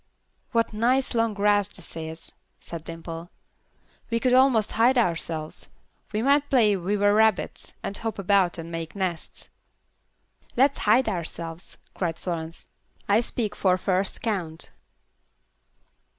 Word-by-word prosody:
"What 230 -2 +1
nice 250 +5 +2
long 230 -2 +1
grass 205 -1 +2
this - - -9
is," 160 0 -5 0.3
said 165 -2 -8
Dimple. 165 +1 -7 0.8
"We 230 -1 +1
could 250 +1 +2
almost 255 -4 +4
hide 240 +4 +3
ourselves. 165 -7 -1 0.4
We 215 +1 -1
might 285 +2 +3
play 225 -7 +4
we 195 +3 -1
were 205 0 +4
rabbits, 220 -1 +1
and 195 - -4
hop 225 +1 -4
about 195 -2 +2
and 165 0 -7
make 165 +1 -5
nests." 185 -4 -4 1.1
"Let's 275 +2 +4
hide 245 +4 +5
ourselves," 170 -1 -5 0.2
cried 165 -3 -2
Florence. 165 -2 -5 0.4
"I 205 +3 +4
speak 220 -3 -1
for 185 -2 +2
first 185 +1 -1
count. 175 -8 -3
200 Hz, 130 wpm, -25 LUFS, 170-230 Hz, 1.1 s, hide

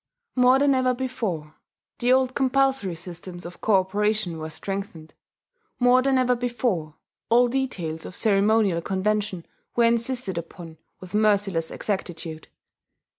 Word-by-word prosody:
More 250 +1 +5
than 280 0 +3
ever 255 -1 +2
before 210 -12 -3 0.5
the 245 +1 +2
old 260 0 +3
compulsory 265 -8 +1
systems 175 +1 -8
of 175 0 -10
cooperation 200 -2 +1
were 155 0 -5
strengthened; 195 -1 -6 0.7
more 245 +1 +5
than 270 0 +2
ever 250 -1 +3
before 235 -10 -2 0.3
all 245 +2 +5
details 195 -12 -3
of 185 - -8
ceremonial 205 -3 +2
convention 195 0 -1 0.3
were 235 - +4
insisted 235 -5 +1
upon 165 -1 -10 0.2
with 185 -1 -12
merciless 200 -6 +2
exactitude. 165 -5 -4
210 Hz, 125 wpm, -24 LUFS, 175-250 Hz, 0.7 s, More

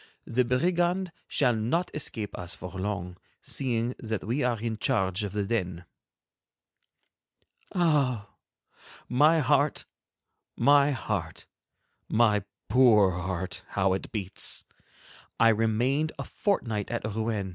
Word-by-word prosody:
The 125 +2 +1
brigand 175 +8 +1 0.2
shall 125 -4 +2
not 125 +12 0
escape 110 -8 -3
us 90 +2 -4
for 90 -2 -8
long, 95 -2 -4 0.2
seeing 120 -2 -1
that 110 -3 -3
we 120 +8 -1
are 120 -3 0
in 115 0 -3
charge 95 0 0
of 100 - -3
the 105 -1 -1
den." 90 -5 -2 1.9
Ah! 140 - +2 0.8
My 155 +6 +4
heart, 145 +1 +2 0.7
my 140 +3 +5
heart, 105 - -3 0.6
my 110 -2 +3 0.3
poor 110 -7 +5
heart, 90 0 -3
how 95 -1 +3
it 95 - -4
beats! 100 -4 -1 0.7
I 115 - +6
remained 120 +8 +1
a - - -4
fortnight 115 - -1
at 120 -2 -3
Rouen. 110 -2 -2
115 Hz, 115 wpm, -28 LUFS, 100-135 Hz, 1.9 s, I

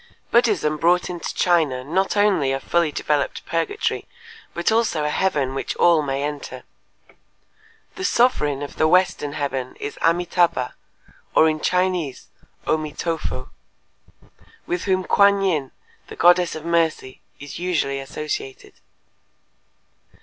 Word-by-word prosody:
_ - - -36
Buddhism 205 -11 +2
brought 175 +3 +2
into 175 -1 -5
China 155 -8 +1
not 190 +8 0
only 195 -10 +3
a 135 - -1
fully 170 +2 +1
developed 145 -1 -1
purgatory 165 - -2 0.4
but 170 +5 0
also 220 -9 +1
a 150 - 0
heaven 145 -8 0
which 135 - -3
all 170 -2 +4
may 140 -1 -2
enter. 145 -1 -5 1.3
The 380 - -5
sovereign 150 - +2
of 145 - -8
the 155 - +3
western 170 -4 +2
heaven 135 -3 -3
is 145 - -6
Amitâbha 170 -5 +1 0.6
(or 160 - +6
in 155 0 0
Chinese 180 -6 -1 0.4
O - - +2
mi 155 -1 -6
to 165 0 -2
fo), 65 - -6 1.1
with 175 0 -3
whom 185 -1 +1
Kuan 200 +1 +4
Yin, 155 -8 0 0.4
the - - -9
goddess 175 0 +4
of 155 0 -8
Mercy, 165 -6 0 0.2
is 145 +3 -8
usually 160 -6 -1
associated. 135 -1 -6
165 Hz, 135 wpm, -22 LUFS, 145-180 Hz, 1.3 s, or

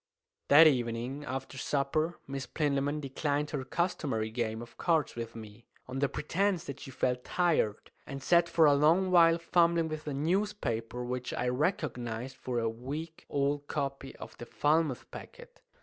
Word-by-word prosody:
That 150 +3 +9
evening, 125 0 +1
after 135 0 -5
supper, 155 +5 0
Miss 135 -1 -5
Plinlimmon 145 -1 0
declined 145 +1 -2
her 145 -3 -2
customary 135 -8 -1
game 110 -1 -2
of 120 - -14
cards 165 -4 +1
with 115 -1 -6
me, 110 0 -11 0.2
on 130 +1 -4
the 140 0 +2
pretence 185 +3 0
that 140 0 -7
she - - -9
felt 125 -1 -1
tired, 165 - 0 0.2
and 135 -2 -6
sat 170 -1 +4
for 165 -1 +4
a 145 - +6
long 165 +6 +3
while 165 -2 +6
fumbling 170 -1 +2
with 155 0 -6
a 145 - -2
newspaper, 145 - -1
which 125 0 -4
I 125 - 0
recognized 125 - -2
for 125 -1 -4
a 115 -1 +1
week 140 +8 -6
old 145 +1 0
copy 140 -2 -4
of - - -10
the 120 - -8
"Falmouth 150 -2 +1
Packet." - - -12
140 Hz, 165 wpm, -30 LUFS, 125-165 Hz, 0.2 s, That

